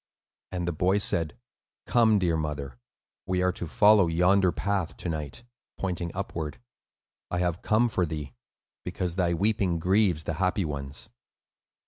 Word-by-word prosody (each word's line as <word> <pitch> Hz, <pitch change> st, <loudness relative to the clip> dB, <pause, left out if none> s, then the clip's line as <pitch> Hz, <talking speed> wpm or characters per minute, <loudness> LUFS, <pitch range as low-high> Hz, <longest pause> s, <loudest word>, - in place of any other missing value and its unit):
And 90 Hz, -2 st, -3 dB
the -, -, +1 dB
boy 90 Hz, +5 st, +2 dB
said, 85 Hz, -6 st, +1 dB, 0.5 s
"Come, 115 Hz, -3 st, +4 dB
dear 90 Hz, -4 st, +1 dB
mother; 70 Hz, -5 st, -4 dB, 0.5 s
we 90 Hz, 0 st, +1 dB
are 90 Hz, -, +3 dB
to 90 Hz, -, -5 dB
follow 105 Hz, +1 st, +5 dB
yonder 90 Hz, +3 st, +3 dB
path 100 Hz, -4 st, -2 dB
to 90 Hz, -, -5 dB
night," 80 Hz, +7 st, -5 dB, 0.3 s
pointing 90 Hz, -3 st, -2 dB
upward. 85 Hz, -5 st, -4 dB, 0.7 s
"I 90 Hz, -, -2 dB
have 90 Hz, -1 st, -1 dB
come 110 Hz, +3 st, +3 dB
for 90 Hz, -6 st, 0 dB
thee, 75 Hz, -4 st, -5 dB, 0.5 s
because 90 Hz, -2 st, -3 dB
thy 90 Hz, -2 st, +1 dB
weeping 100 Hz, -2 st, +1 dB
grieves 90 Hz, -1 st, +2 dB
the 80 Hz, -, -2 dB
happy 95 Hz, 0 st, +1 dB
ones." 70 Hz, +6 st, -6 dB
90 Hz, 145 wpm, -27 LUFS, 80-100 Hz, 0.7 s, follow